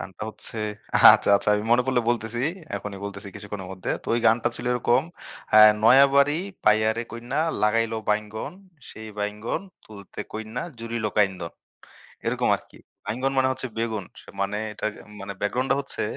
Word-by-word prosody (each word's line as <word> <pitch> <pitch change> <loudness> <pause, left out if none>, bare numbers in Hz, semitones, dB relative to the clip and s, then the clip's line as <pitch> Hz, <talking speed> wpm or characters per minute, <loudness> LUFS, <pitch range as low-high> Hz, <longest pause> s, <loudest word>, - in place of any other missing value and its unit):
গানটা 95 +1 -8
হচ্ছে 110 - -9 0.6
আচ্ছা, - - +1
আচ্ছা 100 - -2
আমি 105 +1 -2
মনে 125 +1 +4
পড়লে 130 -2 +2
বলতেছি, 120 0 -2 0.3
এখনই 100 -1 -7
বলতেছি 100 0 -7
কিছুক্ষণের 100 -2 -7
মধ্যে। 95 -1 -5
তো - - -18
ওই 120 - +1
গানটা 115 +1 +3
ছিল - - -6
এরকম 125 +1 +2 0.5
আ - - +10 0.3
'নয়াবাড়ি 140 +4 +6 0.3
পাইয়ারে 110 +2 +3
কইন্যা 120 +5 -3 0.2
লাগাইলো 115 +1 +2
বাইঙ্গন, 105 +5 -2 0.4
সেই 110 0 -9
বাইঙ্গন 105 +2 -3 0.2
তুলতে 100 -3 -10
কইন্যা 110 +3 -5 0.2
জুড়িল 115 0 -4
কাইন্দন।' 95 -5 0 0.7
এরকম - - 0
আরকি - - -19 0.3
বাইঙ্গন 125 +6 -1
মানে 130 0 +4
হচ্ছে 130 0 -4
বেগুন 110 -3 -2 0.2
স - - -21 0.2
মানে 100 +1 -1 0.2
এটার 110 0 -3 0.3
মানে 100 0 -6
ব্যাকগ্রাউন্ডটা 130 +6 +1
হচ্ছে, 140 - -5
110 Hz, 150 wpm, -25 LUFS, 105-120 Hz, 0.7 s, আ